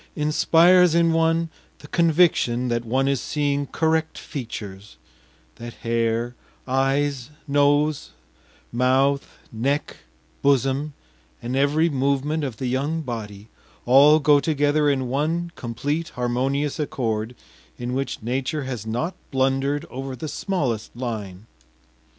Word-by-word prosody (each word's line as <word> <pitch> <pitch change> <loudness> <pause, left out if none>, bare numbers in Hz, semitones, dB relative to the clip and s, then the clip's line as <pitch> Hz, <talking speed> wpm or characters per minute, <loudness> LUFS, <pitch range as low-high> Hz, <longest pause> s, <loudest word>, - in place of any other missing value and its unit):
inspires 165 +3 +4
in 170 -1 +3
one 165 0 +2 0.3
the 145 - -13
conviction 155 -8 +2
that 120 0 -1
one 130 +4 0
is 140 -2 +1
seeing 145 -1 -1
correct 160 +1 0
features; 105 - -8 0.6
that 120 0 -8
hair, 115 +1 0 0.3
eyes, 135 0 0 0.2
nose, 145 +1 +2 0.6
mouth, 130 +3 +1
neck, 135 +6 -2 0.4
bosom, 140 +2 +1 0.4
and 120 +2 -4
every 145 +4 +3
movement 140 +1 0
of 130 -6 -4
the 130 - -4
young 140 +6 -1
body 105 -5 -6 0.4
all 140 +5 +7
go 145 -1 +5
together 145 0 +2
in 130 -2 0
one 160 +6 -1
complete 145 +8 -3
harmonious 130 +4 -1
accord 115 -5 -2 0.4
in 120 +1 -4
which 135 -4 -3
nature 130 +5 -2
has 125 -5 -5
not 140 +11 -2 0.2
blundered 135 +2 0
over 135 +1 -5
the 155 - -6
smallest 140 - -2
line. 110 -6 -5
135 Hz, 115 wpm, -23 LUFS, 120-150 Hz, 0.6 s, all